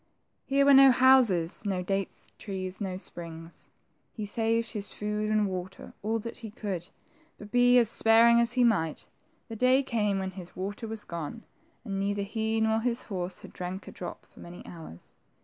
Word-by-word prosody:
Here 275 0 +3
were 280 - +7
no 270 0 +9
houses, 245 -11 +4
no 190 -3 -1
date 195 +1 -3
trees, 190 -1 -5
no 185 -2 -3
springs. 165 -3 -9 0.4
He 215 - -5
saved 225 +2 0
his 205 -3 -6
food 210 0 -3
and 215 -1 +2
water, 185 0 -6
all 220 +2 0
that 230 +1 -7
he 225 - -8
could, 195 -5 -5 0.5
but 210 0 -12
be 245 +1 +5
as 235 -2 +5
sparing 230 +1 +5
as 235 +1 +1
he 250 -1 +3
might, 165 -10 +1 0.4
the 225 - -7
day 255 +4 +4
came 210 -6 0
when 190 -1 -3
his 180 -2 -11
water 205 +4 -5
was 220 -1 -6
gone, 170 +6 -6 0.4
and 195 -3 -3
neither 200 +1 -1
he 220 +2 -1
nor 220 0 +2
his 240 +1 -1
horse 185 -3 -4
had - - -12
drank 185 +2 -6
a - - -7
drop 175 - -8
for - - -20
many 175 +1 -11
hours. 160 - -11
210 Hz, 185 wpm, -28 LUFS, 185-230 Hz, 0.5 s, no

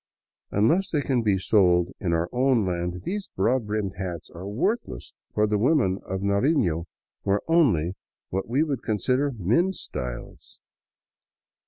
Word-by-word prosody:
Unless 160 - +2
they 150 - 0
can 130 -4 +1
be 105 -4 +2
sold 90 -3 +3
in 90 - -1
our 85 +1 +1
own 125 -3 +2
land, 90 0 -3
these 200 +1 -4
broad 115 +4 +1
brimmed 105 -4 -2
hats 90 -4 -5
are 90 +3 -8
worthless, 120 - -2 0.2
for 105 - +3
the 105 -1 0
women 120 - +2
of 95 0 -3
Narifio 100 - +1 0.4
wear 100 +1 +1
only 110 - +3 0.4
what 95 +3 -2
we 135 +6 +2
would 140 -6 -2
con 110 -2 -1
sider 130 +8 +1
" 120 - -11 0.2
men's 185 +5 +2
styles." 60 -1 -7
105 Hz, 155 wpm, -25 LUFS, 90-135 Hz, 0.4 s, sold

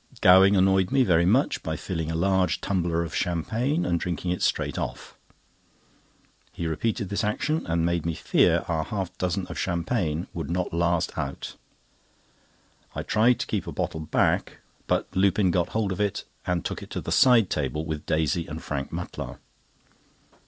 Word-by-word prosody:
Gowing 95 +2 +7
annoyed 95 -1 +3
me 135 -1 +3
very 85 -5 +3
much 125 +9 +2
by 80 - -3
filling 80 -3 -4
a 80 - -2
large 95 -1 +2
tumbler 85 -3 0
of 80 -1 -7
champagne, 115 - -1
and 85 -1 +1
drinking 90 +1 -2
it 90 - -2
straight - - 0
off. - - -5 1.4
He 85 - -5
repeated 95 +5 -1
this 100 - -1
action, 155 +9 -1
and 85 0 +1
made 85 -1 0
me 85 0 -2
fear - - +2
our 80 -1 0
half 95 -2 -4
dozen 90 +1 -1
of - - -7
champagne 85 -2 -1
would 85 -1 -5
not 90 0 -2
last 85 0 0
out. 70 - -5 1.4
I - - -3
tried 115 +3 +3
to - - -1
keep - - -3
a - - -4
bottle 80 - -3
back, 80 - 0 0.3
but - - +1
Lupin 95 0 +3
got 85 0 +1
hold 110 -3 -1
of 95 - -2
it, 100 -2 -1 0.2
and 90 -2 -1
took - - -3
it - - -10
to - - -4
the - - -5
side 125 -7 +5
table 75 +2 -1
with 80 -2 -5
Daisy 80 +2 0
and 80 0 -6
Frank 70 -2 -4
Mutlar. - - -6
90 Hz, 175 wpm, -26 LUFS, 80-100 Hz, 1.4 s, Gowing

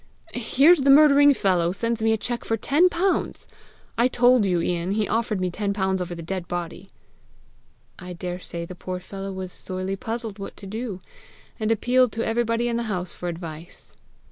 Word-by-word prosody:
here's 275 +7 +4
the 275 - +2
murdering 285 0 +7
fellow 180 -9 +1
sends 230 +3 -2
me 225 0 +3
a 220 - +2
cheque 240 +2 -3
for 225 - -1
ten 305 - +3
pounds! 365 +3 -1 0.5
I 240 - +5
told 245 -3 +4
you, 180 -2 +1
Ian, 175 +2 -1
he 210 0 0
offered 220 -3 -1
me 185 -1 -1
ten 200 +2 -2
pounds 190 -2 0
over 175 -1 -4
the 165 - -8
dead 180 +1 -4
body!" 175 +2 -5 1.1
"I 180 -1 -8
daresay 175 -1 -6
the 185 - -9
poor 180 0 -6
fellow 195 +1 -7
was 190 -1 -6
sorely 185 +1 -4
puzzled 225 0 -5
what 195 - -8
to 200 - -11
do, 210 -1 -5 0.6
and 215 -1 -1
appealed 245 +2 +3
to 230 - -2
everybody 230 +1 0
in 235 -1 -1
the 235 - -1
house 180 -3 -3
for 175 - -5
advice!" 165 -1 -9
200 Hz, 185 wpm, -24 LUFS, 180-235 Hz, 1.1 s, murdering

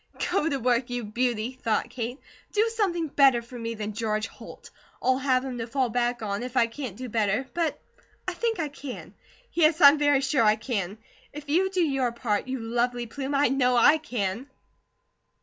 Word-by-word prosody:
"Go 325 -4 +2
to 280 - 0
work, 245 0 +1
you 245 -1 -3
beauty," 235 +1 -1
thought 220 -2 0
Kate. 245 +1 -4 0.4
"Do 435 +2 +3
something 355 -7 0
better 270 -4 +5
for 240 +1 -10
me 230 0 -4
than 210 0 -4
George 215 -1 -1
Holt. - - -12 0.3
I'll 260 +1 +2
have 260 -1 +1
him 250 -2 -5
to 230 - -4
fall 260 0 0
back 240 0 -1
on 200 0 -2
if 250 +1 -5
I 235 - +5
can't 230 -3 -7
do 255 - -6
better; 220 +2 0
but 335 -2 -1 0.5
I - - -1
think 460 -4 -1
I 315 - 0
can. 280 -2 -9 0.4
Yes, 320 -1 +3
I'm 285 -1 +8
very 290 -2 +3
sure 270 -3 +2
I 215 0 +5
can! 215 -4 -3 0.4
If 295 0 -9
you 365 +6 +3
do 375 -1 0
your 270 -5 0
part, 235 -2 -2
you 260 0 -2
lovely 240 +1 -1
plume, 270 +4 -4
I 280 -1 +3
KNOW 250 -1 +2
I 295 +6 +6
can!" 240 -3 -3
250 Hz, 195 wpm, -26 LUFS, 230-285 Hz, 0.5 s, I'm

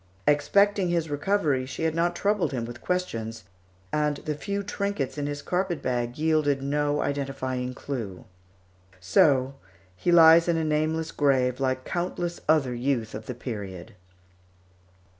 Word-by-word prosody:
Expecting 190 +6 +3
his 165 -3 -1
recovery, 145 -4 0
she 135 +4 -5
had 160 -1 +1
not 170 +1 +1
troubled 205 0 +1
him 120 -3 -2
with 120 +1 -9
questions, 115 - -3 0.5
and 150 -1 +1
the 150 - -1
few 200 +7 -3
trinkets 200 -8 -2
in 145 -1 -3
his 145 0 -5
carpet 180 -2 -1
bag 120 -1 -2
yielded 155 -3 +2
no 145 +1 0
identifying 130 -3 -3
clue. 115 -11 -6 0.7
So 135 - +3 0.4
he 175 - 0
lies 165 0 +7
in 170 -1 +2
a 160 - 0
nameless 155 +1 0
grave, 130 -3 +2
like 130 -1 -1
countless 175 0 -3
other 145 -5 +3
youth 120 -2 -1
of 110 +1 -7
that 125 - -5
period. 100 -7 -6
145 Hz, 140 wpm, -26 LUFS, 130-170 Hz, 0.7 s, lies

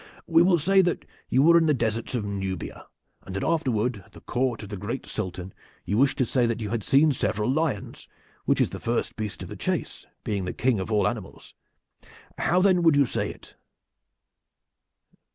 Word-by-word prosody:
We 165 0 +4
will 175 0 +5
say 190 +5 +4
that 175 -2 -1 0.2
you 130 - +3
were 170 +2 +7
in 165 - +2
the 150 - +3
deserts 115 0 -2
of 110 -4 -2
Nubia, 95 -4 -5 0.3
and 95 - -9
that 100 - -2
afterward 125 -8 0
at - - -24
the - - -13
court 120 -3 -1
of 105 - -9
the 105 - -5
great 105 +7 -5
Sultan 95 -3 -5 0.3
you 100 - -1
wished 135 0 +3
to 130 - +2
say 120 0 +2
that 115 0 -2
you 105 -2 -4
had 115 -2 -1
seen 140 +7 +4
several 110 -2 0
lions, 145 -7 -2 0.4
which - - +2
is - - +2
the - - -6
first 120 0 -2
beast 110 -3 -5
of - - -9
the - - -7
chase, - - -3 0.2
being 100 -3 -2
the 90 - -3
king 125 -4 +1
of 95 +4 -4
all 105 -3 +3
animals. 105 -3 -6 0.9
How 180 - +2
then 185 -2 +4
would 165 -3 +5
you 140 -1 +5
say - - -2
it?" - - -12
120 Hz, 200 wpm, -26 LUFS, 105-150 Hz, 0.9 s, were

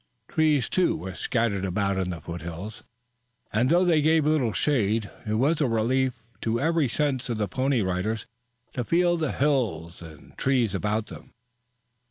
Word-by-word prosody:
Trees, 155 -5 +2
too, 185 - +2
were 95 +4 -6
scattered 110 -2 -1
about 100 +1 0
in 90 -1 -1
the 85 -2 -4
foothills, 85 +5 -7 0.7
and 120 +4 +2
though 175 +3 +4
they 165 -4 +4
gave 155 0 +3
little 150 -7 +2
shade 110 -6 0 0.2
it 105 - 0
was 145 +8 +2
a 145 - +3
relief 125 +3 0 0.2
to 115 +1 0
every 160 -1 +2
sense 130 -1 -1
of 115 - -1
the 105 -1 0
Pony 130 +5 +1
Riders 95 +4 -2 0.5
to 125 - -2
feel 175 +6 +2
the 160 -4 -1
hills 110 - 0
and 80 -3 -13
trees 125 -6 +2
about 105 +1 -1
them. - - -12
115 Hz, 165 wpm, -26 LUFS, 100-145 Hz, 0.7 s, though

